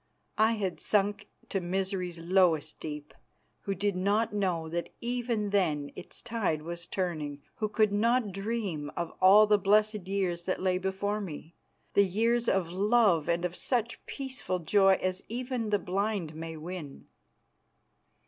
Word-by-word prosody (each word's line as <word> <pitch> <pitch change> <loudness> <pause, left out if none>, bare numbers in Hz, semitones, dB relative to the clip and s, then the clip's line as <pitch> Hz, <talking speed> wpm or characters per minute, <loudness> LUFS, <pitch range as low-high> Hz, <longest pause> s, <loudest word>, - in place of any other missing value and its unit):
I 220 +1 +5
had 195 -5 -2
sunk 205 0 0 0.2
to 195 - -1
misery's 185 -1 -2
lowest 165 -3 +2
deep, 150 -1 -6 0.5
who 195 - -1
did 200 0 0
not 205 +4 +1
know 180 -6 0
that 170 +1 -3
even 235 -4 -1
then 150 -8 +1
its - - -10
tide 195 -10 -1
was 170 +1 -6
turning, 155 -6 -3
who 215 -4 -1
could 215 -1 +2
not 230 +1 +2
dream 195 -7 -3
of 170 -1 -2
all 200 +3 +8
the 210 -1 +4
blessed 210 0 +2
years 185 -3 -1
that 185 - -1
lay 185 -1 +1
before 195 +2 -1
me, 165 -3 -7 0.4
the 200 - +6
years 230 +5 +1
of 180 -3 +1
love 200 -4 +3
and 170 +1 +1
of 180 0 -3
such 235 +1 -1
peaceful 265 -9 -3
joy 195 +3 +4
as 185 0 -1
even 245 -1 -3
the 205 - +3
blind 195 -3 -2
may 160 0 -6
win. 160 -3 -7
195 Hz, 150 wpm, -29 LUFS, 170-210 Hz, 0.5 s, all